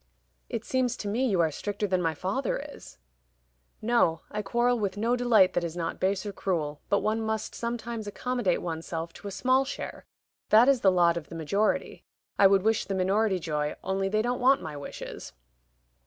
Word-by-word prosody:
"It - - -4
seems 255 -2 0
to 205 - -5
me 240 +6 +1
you 190 -7 +2
are 160 -2 +2
stricter 205 +6 -3
than 185 -2 +1
my 165 -2 0
father 200 - -1 0.2
is." - - -13 0.9
"No; 215 -9 +2
I 210 - -2
quarrel 240 +4 +1
with 200 -2 -2
no 230 +4 +1
delight 235 -6 +4
that 175 - 0
is 170 0 -4
not 165 -1 -3
base 190 +1 0
or 205 - -4
cruel, 155 -7 -2
but 200 - +2
one 220 +1 0
must 220 -1 -2
sometimes 235 -2 -4
accommodate 240 -3 -1
one's 165 -2 -4
self 165 0 -4
to 205 - -10
a - - -5
small 255 +6 +2
share. 275 - -7 0.4
That 225 +4 +7
is 275 -3 +4
the 190 - +5
lot 170 -2 +3
of 160 - -7
the 165 - -8
majority. 195 +7 -1 0.4
I 195 - +8
would 195 -1 +3
wish 220 +1 +2
the 195 - -3
minority 195 +2 +2
joy, 150 -3 -2
only 195 0 -1
they 215 +2 +1
don't 245 +1 -1
want 265 +2 +5
my 155 -2 -7
wishes." 145 - -8
200 Hz, 200 wpm, -28 LUFS, 175-235 Hz, 0.9 s, I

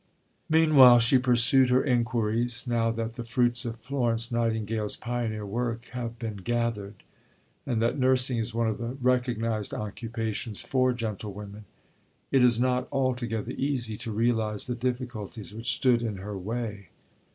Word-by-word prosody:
Meanwhile 155 -6 +7
she 125 +3 +5
pursued 125 +1 +4
her 125 +1 +3
inquiries. 120 -2 0
Now 115 -2 +1
that 115 0 -3
the 120 - -4
fruits 120 +1 +1
of 115 -1 -5
Florence 120 -4 -1
Nightingale's 110 -2 0
pioneer 115 -3 -3
work 115 +2 -3
have 120 -2 -5
been 110 -3 -5
gathered, 110 -2 -3 0.6
and 120 -4 0
that 120 +4 0
nursing 130 -1 +2
is 115 +1 -1
one 115 0 0
of 110 - -2
the 120 +3 -4
recognized 120 -4 0
occupations 110 0 -4
for 130 -1 +2
gentlewomen, 105 -3 -6 0.7
it 135 -2 +4
is 120 -2 +4
not 125 0 +1
altogether 125 -4 -1
easy 130 -6 -1
to 115 - -5
realize 110 -1 0
the 125 - -2
difficulties 120 -4 -4
which 115 +4 -1
stood 125 -3 +3
in 110 -4 -3
her 100 +2 -6
way. 105 0 -5
115 Hz, 145 wpm, -27 LUFS, 110-125 Hz, 0.7 s, Meanwhile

